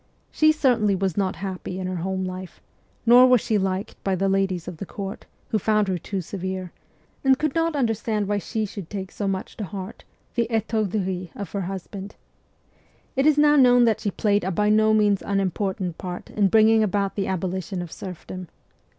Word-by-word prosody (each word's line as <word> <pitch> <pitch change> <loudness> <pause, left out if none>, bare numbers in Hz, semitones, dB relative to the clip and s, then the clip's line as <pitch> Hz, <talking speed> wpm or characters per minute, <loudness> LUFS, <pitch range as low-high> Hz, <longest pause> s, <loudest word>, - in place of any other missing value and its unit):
She 310 0 +4
certainly 240 -9 +2
was 190 -2 -1
not 195 -2 0
happy 190 -1 -5
in 185 - -3
her 185 0 -3
home 190 +2 -2
life; 185 0 -7 0.5
nor 245 +2 +8
was 250 -1 +6
she 215 0 0
liked 190 +1 -3
by 195 -1 +1
the 195 +2 0
ladies 190 -3 0
of 180 -3 -6
the 195 - -5
court, 200 +1 -6 0.2
who 215 - +1
found 215 0 +2
her 185 -2 -1
too 195 +3 -4
severe, 185 0 -5 0.5
and 265 -1 +5
could 305 -1 -1
not 330 -1 +1
understand 225 -5 0
why 205 0 0
she 220 +2 -2
should 195 -4 -8
take 195 -2 -5
so 205 - -3
much 190 -1 -3
to 215 - -4
heart 195 +2 -7 0.3
the 235 -1 +1
ttourderies 205 -5 -1
of 200 -5 -6
her 200 - -2
husband. 195 +2 -6 1.0
It 270 +2 +3
is 305 -1 +4
now 295 0 +5
known 245 -3 +6
that 225 -3 +3
she 205 - -1
played 205 0 +1
a 185 - -1
by 210 +3 +2
no 215 0 +4
means 210 -2 +3
unimportant 190 -2 -1
part 180 -1 -6
in 205 -2 +2
bringing 220 +2 +5
about 200 -1 0
the 195 - -1
aboli 185 0 -2
tion 185 -2 -4
of 170 - -9
serfdom. 185 0 -8
200 Hz, 195 wpm, -24 LUFS, 185-220 Hz, 1.0 s, nor